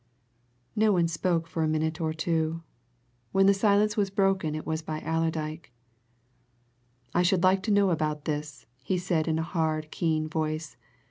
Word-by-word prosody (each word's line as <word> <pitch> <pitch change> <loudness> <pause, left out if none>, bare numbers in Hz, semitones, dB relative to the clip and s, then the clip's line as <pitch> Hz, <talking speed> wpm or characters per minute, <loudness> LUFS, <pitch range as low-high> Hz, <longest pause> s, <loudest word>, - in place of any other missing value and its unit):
No 215 0 +4
one 175 -3 +3
spoke 165 0 0
for 165 0 -4
a 160 - +2
minute 155 +1 -1
or 160 -1 0
two. 160 0 -1 0.7
When 195 0 +4
the 200 - +6
silence 210 +1 +3
was 205 -3 +1
broken 190 -5 +1
it 155 - -5
was 160 0 -2
by 155 -1 -4
Allerdyke. 160 -2 -2 1.4
"I 175 - +3
should 180 0 +2
like 190 +1 +4
to 215 - -1
know 200 -2 +4
about 150 -2 -1
this," 150 -4 -4 0.2
he 185 +7 -1
said 175 -3 0
in 160 -1 +1
a 160 - 0
hard, 155 -2 -1
keen 155 -2 0
voice. 155 0 -3
160 Hz, 170 wpm, -27 LUFS, 155-185 Hz, 1.4 s, the